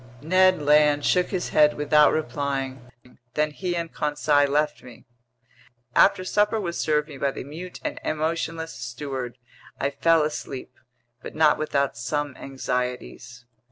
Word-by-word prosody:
Ned 185 +2 +4
Land 150 0 +4
shook 180 0 +3
his 185 -3 -3
head 150 -1 +4
without 150 +1 +4
replying; 135 -4 -3 0.5
then 150 0 +1
he 175 +3 -3
and 170 -1 -4
Conseil 145 -1 +1
left 150 +1 0
me. 125 -2 -14 0.9
After 190 -1 +5
supper 210 +3 +1
was 175 -4 -4
served 150 -1 +1
me 140 -4 -10
by 140 - +1
the - - -6
mute 165 +6 -9
and - - -3
emotionless 160 +1 -2
steward, 130 -2 -6 0.4
I 140 - 0
fell 165 0 +3
asleep; 145 -3 -5 0.5
but - - -9
not 155 -1 +4
without 140 -3 0
some 145 +3 -3
anxieties. 125 -1 -5
150 Hz, 140 wpm, -24 LUFS, 140-160 Hz, 0.9 s, After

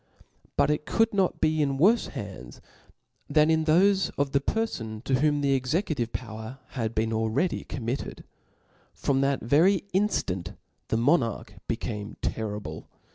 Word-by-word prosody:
But - - +4
it 150 0 -2
could 225 0 +2
not 195 -3 +1
be 155 0 +2
in 140 -2 +1
worfe 210 - +4
hands 100 - -8 0.7
than 150 +1 +4
latho&of 160 -2 +3
the 140 - +3
perfon, 120 - -3
to 130 -1 +1
whom 145 0 +2
the 140 -1 +2
executive 135 - 0
power 110 +1 -6
had 115 -3 -3
been 110 +1 +1
al 110 0 0
ready 170 +11 0
committed. 125 +1 -4 0.7
From' 135 -1 +1
that 135 0 +1
very 165 - +4
inftant 95 - 0 0.3
the 110 - 0
monarch 120 -2 +1
became 105 0 -4
terrible. 105 -8 -4
135 Hz, 135 wpm, -27 LUFS, 110-160 Hz, 0.7 s, But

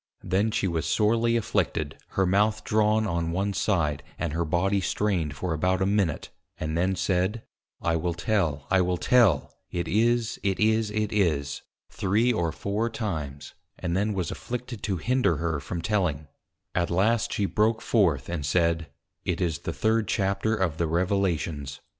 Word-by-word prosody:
_ - - -8
Then 100 +4 +3
she 100 - 0
was 85 -3 -1
sorely 115 +2 +2
Afflicted, 80 -8 -1 0.2
her 95 - +4
Mouth 105 +3 +2
drawn 110 0 +2
on 85 -4 -1
one 100 +3 -1
side, 85 -7 0 0.2
and 85 -4 -2
her 85 +1 0
Body 95 +5 +1
strained 90 -7 0
for 80 +5 -2
about 90 +4 +1
a 95 - +2
Minute, 100 -6 0 0.3
and 80 0 -3
then 95 +3 +1
said, 95 +5 0 0.4
I 80 -1 +2
will 85 +1 -2
tell, 85 -7 0
I 95 -1 +5
will 90 0 +1
tell; 110 - +3 0.2
it 85 0 -3
is, 115 +2 +1
it 95 -2 0
is, 110 0 +3
it 105 0 -1
is, 75 -9 0 0.3
three 110 +6 +2
or 85 -6 0
four 105 +7 -2
times, 80 - -4 0.2
and 90 -1 -2
then 105 +2 0
was 90 -4 -2
afflicted 125 -2 -5
to 95 -3 -1
hinder 120 - +1
her 80 -1 -1
from 85 +4 -5
telling, 85 -9 0 0.5
at 85 -1 0
last 105 +6 +2
she 100 - 0
broke 110 +3 +2
forth, 85 - +2
and 85 -4 -3
said, 85 +2 +1 0.3
_It 85 - -1
is 85 -4 0
the - - -4
third 110 0 +1
Chapter 100 +3 +1
of 90 -6 -1
the 85 - +1
Revelations. 85 -5 -1
95 Hz, 170 wpm, -26 LUFS, 85-105 Hz, 0.5 s, I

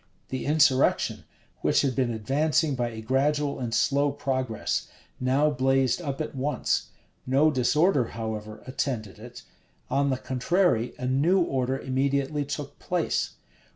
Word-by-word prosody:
The 130 0 -4
insurrection, 145 -3 +3 0.3
which - - +3
had 135 -3 0
been 125 -3 +1
advancing 145 +7 +1
by 120 -2 -1
a 110 -1 -8
gradual 140 +4 +1
and 120 -3 -3
slow 140 +4 +2
progress, 130 -5 -2 0.3
now 135 +4 +2
blazed 135 +1 +2
up 140 -5 -4
at 155 - -3
once. 140 +2 -1 0.4
No 140 +4 +4
disorder, 145 +2 +3
however, 110 -1 -6
attended 120 -6 -3
it. 120 +1 -11 0.5
On 140 0 +2
the 130 - 0
contrary, 130 - +1
a 125 - -5
new 145 +9 +3
order 135 -5 0
immediately 140 +3 0
took 145 0 -6
place. 175 -2 -1
135 Hz, 135 wpm, -26 LUFS, 125-145 Hz, 0.5 s, No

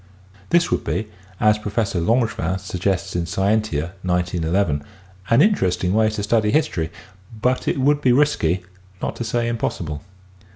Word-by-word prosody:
This 170 -1 +3
would - - +1
be, 95 +7 -2 0.3
as 105 0 +4
Professor 105 -3 -1
Langevin 95 -3 +1
suggests 95 +1 -2
in 85 -1 -1
Scientia, 95 -5 0
191 90 -2 0
1, 70 - -18 0.4
an 115 - +5
interesting 95 - +1
way 110 0 +3
to 105 -1 -3
study 105 0 +2
history, 105 - +1 0.5
but 125 +3 0
it - - +1
would 145 +2 +3
be 130 - +4
risky, 120 - +2 0.4
not - - -3
to - - -3
say 115 +1 -1
impossible. 85 -10 -3
105 Hz, 150 wpm, -21 LUFS, 90-115 Hz, 0.5 s, an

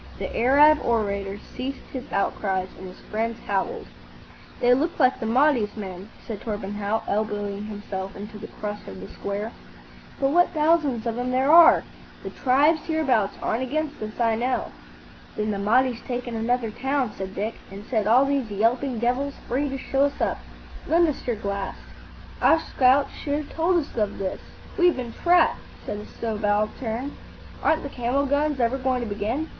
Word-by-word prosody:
The - - -5
Arab 290 +5 +6
orator 200 -4 0 0.2
ceased 270 +2 -5
his 260 -2 -6
outcries, 190 -1 -1
and 190 - -8
his 185 - -12
friends 225 +2 -1
howled. 195 -2 -1 0.7
"They 245 0 +5
look 315 +7 0
like 260 -2 +4
the 225 - -3
Mahdi's 245 -3 +2
men," 190 -1 -7 0.2
said 220 -4 -6
Torpenhow, 205 0 -2
elbowing 205 -1 -2
himself 200 -2 -6
into 210 +1 -8
the 215 - -7
crush 210 0 -6
of 95 - -8
the 95 - -8
square; 205 +3 -4 0.7
"but 270 0 +2
what 350 +2 +3
thousands 300 -7 +2
of 230 0 -2
'em 250 +1 -1
there 260 +3 +2
are! 335 0 +8 0.4
The - - -6
tribes 290 +5 +3
hereabout 270 -11 +2
aren't 225 - 0
against 295 +2 -2
us, 215 +2 -6
I 230 -1 +3
know." 245 +3 -1 0.6
"Then 215 0 -1
the 200 - -2
Mahdi's 240 +4 +2
taken 245 -1 -4
another 230 0 0
town," 265 0 -1
said 190 0 -6
Dick, 215 +3 -2 0.2
"and 200 +2 -9
set 220 -4 0
all 250 +5 +6
these 275 -4 0
yelping 235 +5 +1
devils 250 +5 0
free 280 +4 0
to 270 - -3
show 270 +1 +1
us 285 - -3
up. - - 0 0.5
Lend 335 +1 +4
us 290 - -5
your 240 - +1
glass." 200 -2 -3 0.7
"Our 325 - +5
scouts 270 -2 +3
should 285 -1 -2
have 300 -1 -5
told 345 +3 +2
us 305 -4 -3
of 210 -3 -1
this. 190 -1 -3 0.4
We've 355 -1 +5
been 240 -2 -5
trapped," 350 0 +3 0.3
said 205 - -4
a 210 - -9
subaltern. 220 +4 -2 0.5
"Aren't 315 - +2
the 280 - -5
camel 255 +3 0
guns 285 0 +1
ever 245 +3 +1
going 255 -1 0
to 235 - -3
begin? 215 +9 -2
240 Hz, 175 wpm, -25 LUFS, 210-275 Hz, 0.7 s, are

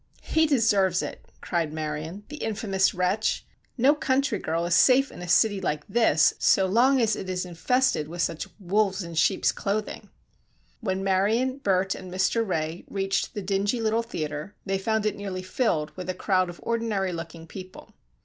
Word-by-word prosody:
"He 320 0 +2
deserves 205 - +3
it," - - -7 0.2
cried 165 -3 -1
Marion, 155 +5 -5
"the 300 - -7
infamous 200 -5 0
wretch! 185 +4 0 0.3
No 265 +4 +5
country 270 -6 0
girl 165 +2 -1
is 175 - 0
safe 265 +8 +5
in - - -10
a 180 - -6
city 195 +3 +3
like 150 -1 -2
this 225 -10 +4
so 190 - +4
long 245 +8 +4
as 220 -3 +2
it 185 - -6
is 185 0 -2
infested 180 - +1
with 170 +2 -2
such 165 -1 -2
wolves 195 +1 +1
in 170 -1 -8
sheeps' 165 +4 +2
clothing." 210 +1 -3 0.7
When 190 -4 -2
Marion, 220 +8 +1
Bert 190 -4 +1
and 185 -1 -9
Mr. 190 +5 +1
Ray 165 -4 -3
reached 195 -1 -1
the 205 - -4
dingy 200 +5 0
little 225 0 +1
theatre 155 -4 -5
they 195 -1 -1
found 220 +2 0
it 215 - 0
nearly 190 -2 -5
filled 185 -6 0
with 185 -1 -6
a 185 - -1
crowd 185 -3 +1
of 175 - -10
ordinary 220 -5 -1
looking 165 -1 -7
people. 185 +2 -11
195 Hz, 175 wpm, -26 LUFS, 175-220 Hz, 0.7 s, No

